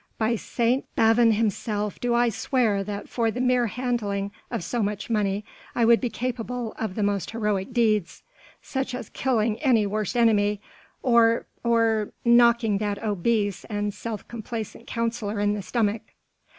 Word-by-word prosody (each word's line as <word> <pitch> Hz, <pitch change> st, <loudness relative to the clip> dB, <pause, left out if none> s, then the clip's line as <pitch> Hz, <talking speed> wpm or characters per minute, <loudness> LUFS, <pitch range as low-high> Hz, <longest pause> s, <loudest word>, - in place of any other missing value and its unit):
By 225 Hz, +1 st, +1 dB
St. 240 Hz, +3 st, 0 dB
Bavon 225 Hz, 0 st, +5 dB
himself 210 Hz, -1 st, -1 dB
do 240 Hz, -1 st, +1 dB
I 240 Hz, 0 st, +3 dB
swear 220 Hz, -2 st, 0 dB
that 205 Hz, 0 st, -5 dB
for 230 Hz, -2 st, 0 dB
the 235 Hz, -, -4 dB
mere 250 Hz, -1 st, +2 dB
handling 210 Hz, -4 st, -2 dB, 0.2 s
of -, -, -3 dB
so 235 Hz, +7 st, -2 dB
much 210 Hz, +2 st, -3 dB
money 205 Hz, -1 st, 0 dB, 0.3 s
I 235 Hz, -, +3 dB
would 235 Hz, 0 st, +5 dB
be 245 Hz, -, 0 dB
capable 245 Hz, -1 st, -4 dB
of 215 Hz, -4 st, -3 dB
the 215 Hz, -, -1 dB
most 200 Hz, -2 st, 0 dB
heroic 210 Hz, -1 st, -1 dB
deeds... 215 Hz, -6 st, +1 dB, 0.4 s
such 265 Hz, -2 st, -3 dB
as 245 Hz, -4 st, -7 dB
killing 225 Hz, -4 st, 0 dB
my 235 Hz, -7 st, +4 dB
worst 215 Hz, +3 st, -2 dB
enemy... 210 Hz, -3 st, +3 dB, 0.4 s
or... 235 Hz, -2 st, +4 dB, 0.2 s
or... 225 Hz, -2 st, +2 dB
knocking 235 Hz, -3 st, +5 dB
that 205 Hz, 0 st, -2 dB
obese 205 Hz, -1 st, 0 dB
and 205 Hz, -1 st, -2 dB
self 220 Hz, -1 st, -6 dB
complacent 230 Hz, 0 st, -6 dB
councillor 230 Hz, -3 st, -2 dB
in 205 Hz, 0 st, +2 dB
the 210 Hz, -, -3 dB
stomach." 215 Hz, 0 st, 0 dB
225 Hz, 155 wpm, -25 LUFS, 205-235 Hz, 0.4 s, Bavon